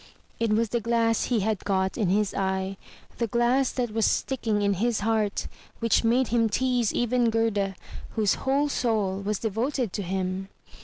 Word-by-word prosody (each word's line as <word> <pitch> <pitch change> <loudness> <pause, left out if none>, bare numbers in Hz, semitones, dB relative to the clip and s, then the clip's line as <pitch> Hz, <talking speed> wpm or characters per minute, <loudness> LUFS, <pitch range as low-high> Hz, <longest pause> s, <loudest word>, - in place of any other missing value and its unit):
It 230 -2 +1
was 225 +1 +1
the 235 +1 -1
glass 230 0 +1
he 235 -4 +1
had 215 0 0
got 190 -1 0
in 210 -6 0
his 205 +1 +1
eye, 190 0 -1 0.4
the 235 - +1
glass 240 +4 +2
that 245 -3 -2
was 225 -1 +2
sticking 225 -6 0
in 200 0 +2
his 235 -2 +1
heart, 215 -1 0 0.3
which 230 0 +2
made 240 +2 +2
him 230 -1 +2
tease 245 -1 +1
even 240 0 +1
Gerda, 215 -4 0 0.4
whose 215 -3 +3
whole 275 +2 +2
soul 215 -8 0
was 205 +1 -1
devoted 230 +2 -2
to 205 - -2
him. 190 0 -3
225 Hz, 170 wpm, -26 LUFS, 200-240 Hz, 0.4 s, whose